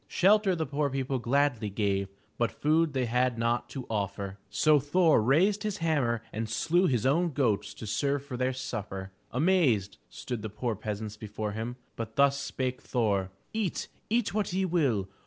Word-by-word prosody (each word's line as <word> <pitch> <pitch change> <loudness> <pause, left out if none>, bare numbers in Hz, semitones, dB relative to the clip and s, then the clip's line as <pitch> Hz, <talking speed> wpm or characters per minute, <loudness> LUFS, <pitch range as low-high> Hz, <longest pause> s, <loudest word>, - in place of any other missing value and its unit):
Shelter 195 0 +4
the 160 -1 -1
poor 145 +1 0
people 135 -1 -1
gladly 120 -3 +1
gave 100 -1 0 0.3
but 120 - +2
food 155 0 +2
they 130 -2 +1
had 125 +1 +1
not 115 +1 0
to 135 -3 -6
offer. 100 -2 -3
So 155 -1 +4
Thor 155 0 +4
raised 180 - +3
his 210 -2 -2
hammer 135 -9 +1
and 110 +1 -3
slew 175 - +2
his 125 -6 +1
own 165 +4 +2
goats 110 -7 +1
to - - -8
serve 140 +6 0
for 135 -3 -6
their 130 +1 0
supper. 105 -7 -5 0.2
Amazed 130 - +2
stood 120 -3 -5
the 110 - -4
poor 110 +2 -2
peasants 105 0 -5
before 105 0 -4
him, 110 +3 -4 0.2
but 110 -1 -6
thus 140 0 +4
spake 130 -2 -3
Thor: 100 -6 0 0.2
"Eat, 215 -6 -2 0.2
eat 230 -1 +1
what 210 -3 0
ye 190 +1 +1
will! 140 - +1
130 Hz, 175 wpm, -29 LUFS, 110-155 Hz, 0.3 s, Shelter